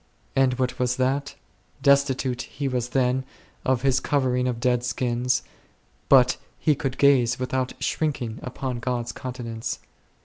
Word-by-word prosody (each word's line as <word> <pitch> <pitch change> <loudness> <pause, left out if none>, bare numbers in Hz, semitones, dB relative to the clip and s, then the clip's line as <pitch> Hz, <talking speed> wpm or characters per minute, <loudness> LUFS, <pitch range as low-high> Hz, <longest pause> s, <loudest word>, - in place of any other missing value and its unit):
And 130 -1 +3
what 130 -1 -1
was 125 -1 +1
that? 135 +2 0 0.5
Des 140 -1 +8
titute 130 -2 -2
he 140 - -4
was 125 -2 -1
then 130 0 +1 0.4
of 130 -1 +1
his 135 -1 +3
covering 130 -4 +1
of 120 -2 -2
dead 125 0 +1
skins, 125 0 0 0.7
but 125 -2 +6 0.2
he 155 - +3
could 135 -3 -3
gaze 130 -4 +4
without 130 0 -1
shrinking 130 -8 -2
upon 125 -1 -4
God's 120 -1 -2
countenance. 120 -3 -5
125 Hz, 140 wpm, -25 LUFS, 125-135 Hz, 0.7 s, Des